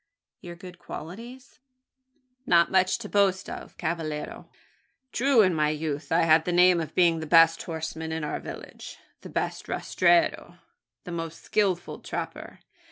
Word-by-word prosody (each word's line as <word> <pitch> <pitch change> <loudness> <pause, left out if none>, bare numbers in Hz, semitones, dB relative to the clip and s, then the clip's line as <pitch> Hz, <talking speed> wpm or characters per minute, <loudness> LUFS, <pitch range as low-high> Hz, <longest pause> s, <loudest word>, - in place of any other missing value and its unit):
"Your 175 -1 -9
good 180 0 -12
qualities?" 235 - -10 0.9
"Not 170 -1 +4
much 185 -1 +3
to 235 - -8
boast 195 -2 +1
of, - - -9
cavallero. 160 -3 -4 0.6
True, 260 -3 +4
in 185 -2 +2
my 150 -2 +1
youth, 150 -1 -4
I 165 - +4
had 160 0 +5
the 180 - -2
name 180 0 +5
of 160 - -7
being 170 -2 +4
the 160 - -6
best 165 0 +5
horseman 160 -1 -5
in 160 -1 -3
our 150 - -3
village - - -9 0.2
the - - -10
best - - -3
rastreador 340 -2 +1 0.5
the 180 - -8
most 165 -1 -6
skilful 195 -4 -1
trapper. - - -7
170 Hz, 150 wpm, -26 LUFS, 160-190 Hz, 0.9 s, had